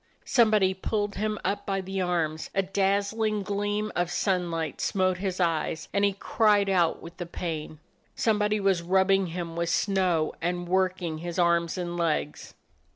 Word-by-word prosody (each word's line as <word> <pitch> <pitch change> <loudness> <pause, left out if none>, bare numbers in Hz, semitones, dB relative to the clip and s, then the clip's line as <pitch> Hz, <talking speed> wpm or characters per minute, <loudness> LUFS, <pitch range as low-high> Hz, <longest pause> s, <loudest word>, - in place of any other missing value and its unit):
Somebody 215 -5 +4
pulled 205 +2 -2
him 215 0 -2
up 200 - -1
by 195 -1 0
the 190 0 -3
arms: 165 -3 -1
a 195 - +3
daz 200 +1 +1
zling 215 -2 0
gleam 205 +1 -1
of 175 0 0
sunlight 175 -5 -1
smote 185 -2 +1
his 190 -1 -3
eyes, 160 -2 -1
and 200 - +1
he 200 -1 +3
cried 205 0 +2
out 175 -4 +2
with 170 +1 -11
the 175 - -5
pain. 160 -3 -5 0.4
Somebody 210 -1 +1
was 195 -3 +2
rubbing 190 +2 +3
him 170 -1 -5
with 170 0 -1
snow, 180 -4 +1
and 175 +1 -2
working 185 -3 0
his 175 +1 -5
arms 170 -1 +2
and 175 -1 -3
legs. 155 -3 -2
185 Hz, 160 wpm, -27 LUFS, 170-200 Hz, 0.4 s, Somebody